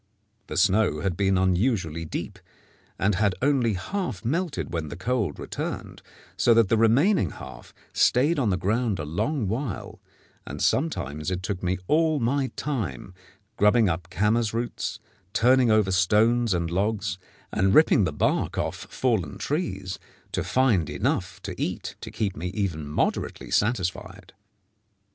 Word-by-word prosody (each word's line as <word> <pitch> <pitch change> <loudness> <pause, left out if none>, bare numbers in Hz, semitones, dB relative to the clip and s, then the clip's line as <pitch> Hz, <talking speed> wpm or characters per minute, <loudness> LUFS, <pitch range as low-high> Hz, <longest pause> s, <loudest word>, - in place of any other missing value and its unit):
The - - -5
snow 95 -5 +3
had 95 -3 -1
been 95 0 +2
unusually 90 -3 +1
deep, - - -5 0.6
and 105 +2 +2
had 100 0 +1
only 130 -5 +2
half 110 - -4
melted 165 - -2
when 80 -3 -2
the - - -6
cold 105 - -1
returned, - - -5 0.3
so 115 - +4
that 115 -4 +4
the - - +4
remaining 115 - +3
half - - -11 0.2
stayed 145 +6 +3
on 120 -6 +1
the 90 - +1
ground 110 +2 0
a 75 - -4
long 110 - -1
while, 115 +1 -4 0.4
and - - -7
sometimes 75 - 0
it 90 0 -3
took 95 -1 -3
me 95 +1 0
all 155 -1 +3
my 135 +3 +1
time, 95 - -4 0.4
grubbing 105 +1 +4
up 85 0 -3
camas 105 +4 +1
roots, 115 -1 -3 0.3
turning 125 +1 +4
over 110 -3 +3
stones 110 +4 +3
and 85 -1 -2
logs, 95 -3 -1 0.3
and 95 0 +2
ripping 155 -7 +6
the 80 - 0
bark 75 - 0
off - - -3
fallen 110 - -1
trees, 95 - -3 0.3
to - - -1
find 115 - +2
enough - - -1
to - - -4
eat - - -3
to - - -6
keep 100 -3 -2
me 85 +4 -4
even 85 -8 -2
moderately 75 - -2
satisfied. 95 -3 -1
105 Hz, 150 wpm, -25 LUFS, 90-120 Hz, 0.6 s, ripping